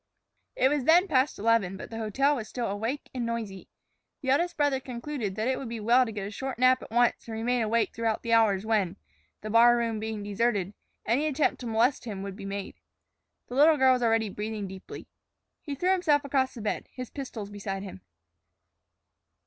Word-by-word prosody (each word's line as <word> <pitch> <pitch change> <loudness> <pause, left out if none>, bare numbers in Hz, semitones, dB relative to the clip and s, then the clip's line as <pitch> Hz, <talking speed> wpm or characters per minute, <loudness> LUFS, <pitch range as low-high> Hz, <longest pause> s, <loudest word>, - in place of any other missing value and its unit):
It 260 - +3
was 285 -3 0
then 345 +5 +5
past 270 -2 +2
eleven, 205 -4 +1
but - - -9
the 225 - -5
hotel 270 +7 +1
was 220 -3 -5
still 245 -2 -3
awake 225 +8 -3
and 250 -2 -3
noisy. 225 -5 -4 0.5
The 260 - +1
eldest 345 +6 +1
brother 290 -3 +2
concluded 250 -4 -5
that 220 +3 -1
it 260 0 0
would 265 - -6
be 230 -1 -5
well 240 +4 +4
to - - -5
get 205 -2 -5
a - - -7
short 265 +4 -5
nap 255 +1 +4
at - - -10
once 240 +1 +1
and 225 - -5
remain 245 +2 0
awake 225 +1 +1
throughout 225 -1 -1
the 230 -1 0
hours 215 -3 +3
when, 210 -5 +1 0.5
the 215 - -5
bar 240 +2 +6
room 230 -2 -1
being 220 -1 -4
deserted, 205 -2 0 0.3
any 265 +8 +1
attempt 300 0 +1
to 245 - -6
molest 230 +4 +1
him 200 -4 -5
would 195 -1 -6
be 200 -1 -9
made. 195 0 -6 0.7
The - - -9
little 300 +4 +5
girl 260 -1 +5
was 250 - 0
already 225 -2 +2
breathing 210 0 -4
deeply. 190 0 -10 0.5
He 285 - -5
threw 360 +7 +1
himself 305 -6 +2
across 270 -2 0
the 230 - -7
bed, 210 - -3
his 255 -2 -8
pistols 230 -7 -6
beside 195 -1 -5
him. 140 - -9
230 Hz, 205 wpm, -28 LUFS, 210-260 Hz, 0.7 s, bar